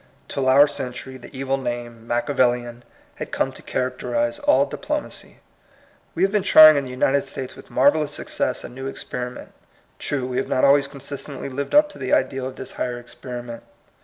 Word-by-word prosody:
Till 130 -1 0
our 140 +3 +7
century, 130 -2 -5
the - - -12
evil 135 0 -2
name. 120 -3 -5
Machiavellian, 120 -1 0 0.3
had - - -6
come - - 0
to - - -13
characterize 120 -2 -2
all 135 +2 +4
diplomacy. 300 - -6 0.7
We - - +1
have 195 - +3
been 210 -1 +2
trying 155 -4 +9
in 140 -1 0
the - - -7
United 135 +2 +1
States 130 -1 -7
with - - -14
marvellous 145 +3 +3
success - - -2
a - - -7
new 135 +2 -7
experiment. 125 -2 -6 0.5
True, 135 -3 -2
we 125 0 -3
have 135 - -1
not 130 - +3
always 140 0 +5
consistently 140 0 -7
lived 140 - -3
up 300 0 +7
to - - -13
the 130 - -2
ideal 130 0 +1
of 130 - -8
this 130 - -8
higher 125 -1 -3
experiment. 120 0 -8
130 Hz, 180 wpm, -23 LUFS, 125-140 Hz, 0.7 s, trying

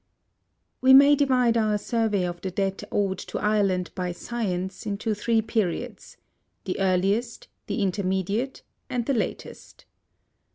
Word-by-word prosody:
We 260 +1 +7
may 280 +2 +8
divide 255 -4 +2
our 215 -2 +2
survey 215 -3 0
of 175 -1 -5
the 190 - -3
debt 195 +1 -2
owed 195 -2 0
to - - -6
Ireland 200 -4 +1
by 180 -1 -3
science 190 -3 -4
into 210 +2 -1
three 225 +2 +1
periods: 210 -6 -3 0.5
the 185 - -3
earliest, 195 +5 0 0.2
the 210 - -1
intermediate, 195 +6 -1 0.3
and 245 -2 -2
the 275 - +1
latest. 230 - -5
210 Hz, 130 wpm, -25 LUFS, 190-235 Hz, 0.5 s, may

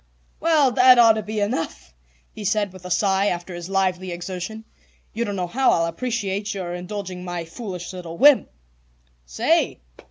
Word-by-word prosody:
"Well, 310 -5 +3
that 255 0 +6
ought 230 -1 +8
to 215 - -2
be 215 +1 -4
enough," 205 - -3 0.4
he 215 - -8
said 205 -1 0
with 185 -1 -13
a - - -6
sigh 195 +2 +2
after 175 -1 -3
his 175 +1 -7
lively 185 -1 0
exertion. 185 +5 -6 0.5
"You 230 - -1
don't 205 -2 -3
know 180 -2 -1
how 255 +9 +1
I'll 165 - +2
appreciate 205 +1 -3
your 180 -3 -4
indulging 180 0 -6
my 175 -2 -4
foolish 180 -1 -7
little 170 -2 -8
whim." 285 +1 +6 0.8
"Say!" - - +1
195 Hz, 165 wpm, -23 LUFS, 175-220 Hz, 0.8 s, ought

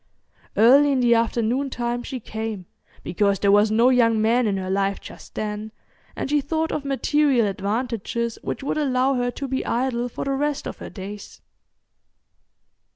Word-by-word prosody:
Early 275 +6 +6
in 265 - +1
the 240 -1 +4
afternoon 235 +3 0
time 240 -1 -2
she 255 +1 -6
came, 220 -4 -5 0.4
because 200 +2 +1
there 200 +1 +2
was 205 +1 +5
no 230 +4 +4
young 230 -3 +3
man 230 +2 +2
in 200 -2 0
her 190 0 -3
life 195 0 0
just - - -13
then, 215 0 -4 0.4
and - - -3
she 295 +1 +2
thought 320 +3 -1
of 295 - -2
material 275 -2 +2
advantages 230 +3 -2
which - - -5
would 295 - -1
allow 265 -2 +2
her 245 -1 0
to 275 +3 -5
be 265 0 -2
idle 245 0 -1
for - - -5
the 275 - -1
rest 290 +1 -1
of - - -6
her - - -7
days. 200 +1 -9
235 Hz, 170 wpm, -23 LUFS, 215-270 Hz, 0.4 s, Early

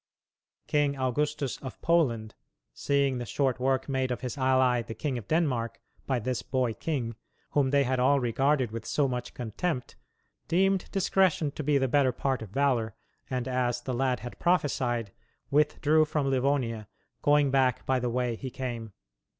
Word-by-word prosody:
King 145 -1 +1
Augustus 140 +1 -1
of 130 - -8
Poland, 120 -11 +2 0.4
seeing 140 -3 +1
the 120 - -4
short 130 +3 0
work 130 0 +1
made 130 -2 0
of 125 - -3
his 125 -2 -4
ally 130 -2 +3
the 115 -1 -7
King 145 -4 -2
of 105 - -12
Denmark, 135 -8 0 0.3
by 130 - +1
this 125 +1 -2
boy 125 -3 0
king, 120 -5 -3 0.4
whom 140 -2 +2
they 140 +1 +3
had 130 0 0
all 140 +3 +4
regarded 130 +1 +1
with 115 0 -5
so 145 -2 +2
much 125 -1 -4
contempt, 125 - -3 0.5
deemed 190 +3 +2
discretion 185 -5 +2
to 150 - -6
be 145 0 +3
the 135 -1 +1
better 135 0 +3
part 130 +1 -1
of 110 - -7
valor 120 -3 +1 0.3
and, 125 -1 -2
as 125 -1 0
the 130 - -3
lad 125 -2 0
had 120 +1 -8
prophesied, 125 - +1 0.4
withdrew 150 +1 +3
from 145 -2 -1
Livonia, 125 -5 0 0.3
"going 145 -1 +4
back 130 -2 +2
by 130 -1 +2
the 125 0 -1
way 120 -1 -1
he 130 +3 -6
came." 120 -5 -5
130 Hz, 165 wpm, -28 LUFS, 120-145 Hz, 0.5 s, all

